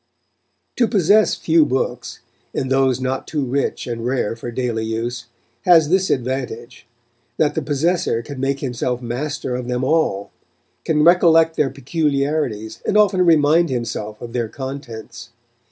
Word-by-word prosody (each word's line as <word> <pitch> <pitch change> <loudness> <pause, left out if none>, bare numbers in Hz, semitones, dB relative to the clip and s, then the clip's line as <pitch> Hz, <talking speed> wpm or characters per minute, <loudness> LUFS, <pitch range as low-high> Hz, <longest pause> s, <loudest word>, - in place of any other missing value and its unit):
To 240 - +3
possess 210 +1 +3
few 165 -1 +3
books, 130 -2 -3 0.3
and 130 - -2
those 130 -2 +2
not 130 0 -3
too 150 -3 -2
rich 135 +3 -2
and 115 -2 -5
rare 125 -3 -1
for 115 +1 -7
daily 120 -2 -2
use, 120 +2 -4 0.4
has 165 -4 +6
this 190 +2 +2
advantage, 125 -2 -3 0.5
that 150 -2 +2
the - - -1
possessor 150 -5 0
can 140 +1 -8
make 135 +1 -1
himself 125 -1 -2
master 125 +2 -4
of 125 -1 -4
them 125 0 -2
all, 130 -9 0 0.5
can 150 -1 +2
recollect 165 -1 +5
their 145 - +1
peculiarities, 140 -5 -2
and 210 - +1
often 195 -3 +4
remind 165 0 +4
himself 110 -4 -4
of 120 -1 -8
their 120 -3 -2
contents. 120 -3 -8
135 Hz, 145 wpm, -20 LUFS, 120-155 Hz, 0.5 s, has